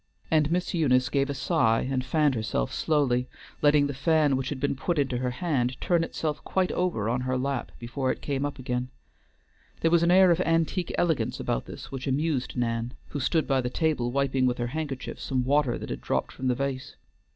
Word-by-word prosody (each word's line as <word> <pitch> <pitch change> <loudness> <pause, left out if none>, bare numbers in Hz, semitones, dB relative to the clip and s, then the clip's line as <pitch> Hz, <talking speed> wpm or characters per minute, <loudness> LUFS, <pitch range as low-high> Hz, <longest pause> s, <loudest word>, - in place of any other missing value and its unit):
And 155 -1 +3
Miss 180 +1 0
Eunice 130 -7 +3
gave 140 0 +1
a 140 - -2
sigh, 135 -6 +2
and 130 0 -1
fanned 150 +1 +2
herself 110 - -2
slowly, 130 -5 +1 0.3
letting 145 -1 +5
the 140 - -2
fan 150 0 +2
which 130 0 -2
had 145 - -4
been 140 0 0
put 170 +5 -2
into 135 -3 +1
her 125 0 -1
hand 125 -2 -1
turn 170 -2 +2
itself 155 -2 -3
quite 185 -1 0
over 175 - -1
on 120 +2 0
her 130 0 -1
lap 135 -1 -2
before 130 +3 -2
it - - -4
came 140 -1 -2
up 145 0 -3
again. 125 -1 -3 0.9
There 165 - +3
was 170 -1 +5
an 170 - +3
air 185 0 +6
of 170 +1 +2
antique 165 +1 +1
elegance 165 -4 0
about - - -2
this - - -9
which 135 0 -5
amused 135 -2 -1
Nan, 115 0 -1
who 145 - -4
stood 155 +4 +1
by 135 -2 +2
the 125 - -2
table 145 -5 0
wiping 135 -1 +1
with 125 - 0
her 120 - -1
handkerchief 145 -5 -4
some 130 -2 -1
water 140 -2 +2
that - - -7
had - - -4
dropped - - -1
from 130 - -4
the 125 - +2
vase. 135 0 -3
135 Hz, 210 wpm, -27 LUFS, 125-155 Hz, 0.9 s, air